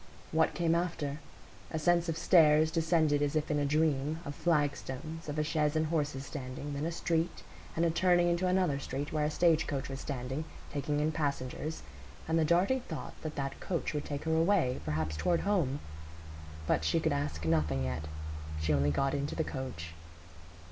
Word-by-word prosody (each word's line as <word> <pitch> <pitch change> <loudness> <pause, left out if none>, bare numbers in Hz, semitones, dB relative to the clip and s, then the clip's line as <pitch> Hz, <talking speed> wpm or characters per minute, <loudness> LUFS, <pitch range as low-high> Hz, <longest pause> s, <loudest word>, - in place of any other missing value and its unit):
What 160 0 +2
came 170 -2 +2
after? 165 -4 -1 0.5
A 160 - -3
sense 170 +2 +2
of 165 - -1
stairs 160 -2 +5
descended 160 -3 +2
as 145 +1 0
if 155 0 0
in 150 - +2
a 145 - +1
dream, 150 0 +1
of 145 - -4
flagstones, 155 0 -1
of 145 - -3
a 155 - +2
chaise 150 -1 +1
and 155 0 +2
horses 145 -4 -1
standing, 140 +1 -6
then 145 +3 -2
a - - -2
street, 165 0 -1 0.3
and 165 - +2
a 165 - +3
turning 175 +1 +4
into 175 +2 +1
another 180 -6 +2
street 140 +1 -4
where 150 -1 +1
a - - +1
stage 165 0 +3
coach 140 -2 -3
was 135 0 -5
standing, 135 +2 -3 0.3
taking 145 +1 -1
in 155 +1 +2
passengers, 150 0 -3 0.4
and 165 +1 +2
the - - +4
darting 180 +11 +3
thought 160 - -6
that 155 -1 -5
that 135 -1 -3
coach 175 -4 -2
would 150 -1 -2
take 145 -1 -4
her 160 0 +1
away, 165 -6 +2
perhaps 75 0 -1
toward 170 - +1
home. 170 -9 +1 0.9
But - - +1
she - - +2
could - - +1
ask 75 +2 -2
nothing 75 -4 +1
yet; 65 +4 -3 0.5
she 75 0 +1
only 70 0 +3
got 135 - +1
into 140 0 -2
the 160 - +1
coach. 125 - -5
150 Hz, 190 wpm, -32 LUFS, 135-165 Hz, 0.9 s, stairs